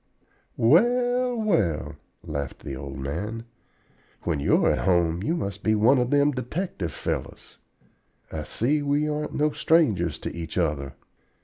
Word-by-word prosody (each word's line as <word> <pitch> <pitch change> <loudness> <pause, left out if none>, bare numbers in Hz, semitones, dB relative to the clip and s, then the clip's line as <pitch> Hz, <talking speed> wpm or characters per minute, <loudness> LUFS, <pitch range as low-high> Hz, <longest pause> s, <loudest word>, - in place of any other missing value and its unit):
"Well, 245 - +3
well," 95 - 0 0.3
laughed 70 -2 -5
the 70 - -4
old 70 0 -7
man, 100 +12 -4 0.8
"when 80 -4 -1
you're 70 - +3
at - - 0
home 85 -2 +2
you 160 - 0
must 100 - -4
be 110 - +2
one 120 +6 +4
of 125 0 0
them 145 +1 +4
detective 125 - -4
fellows. - - -5 0.7
I 80 - -4
see 135 - 0
we 145 +1 +1
aren't 150 0 -3
no 150 +1 +2
strangers 110 - +2
to - - -5
each 80 0 -6
other. 75 -6 -1
110 Hz, 140 wpm, -25 LUFS, -, 0.8 s, one